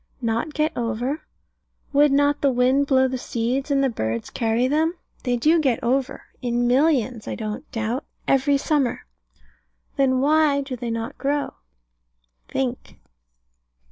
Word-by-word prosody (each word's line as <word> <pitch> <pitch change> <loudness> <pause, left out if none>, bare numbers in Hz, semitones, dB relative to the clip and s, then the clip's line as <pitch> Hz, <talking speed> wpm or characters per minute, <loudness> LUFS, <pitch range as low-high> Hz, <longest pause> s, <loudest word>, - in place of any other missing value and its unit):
Not 230 +6 -1
get 305 +1 0
over? 245 +5 -2 0.7
Would 290 0 +5
not 285 +1 +2
the 280 - +4
wind 260 +3 +2
blow 265 -1 +4
the 260 0 -3
seeds, 245 +5 -2
and 275 -1 +2
the - - +4
birds 115 - -3
carry 230 +2 +1
them? 315 +5 +1 0.3
They 245 -2 0
do 315 +7 +3
get 265 -6 +2
over, 265 +2 0 0.2
in 240 -1 0
millions, 255 -3 +2
I - - -3
don't 215 +6 -6
doubt, 225 +4 -2 0.2
every 275 +1 +3
summer. 275 -4 0 0.9
Then 260 -2 +3
why 295 0 +3
do 270 -2 -5
they 240 -1 -5
not 230 +4 -4
grow? 285 +1 -1 0.9
Think. 255 -2 -4
265 Hz, 140 wpm, -23 LUFS, 240-285 Hz, 0.9 s, Would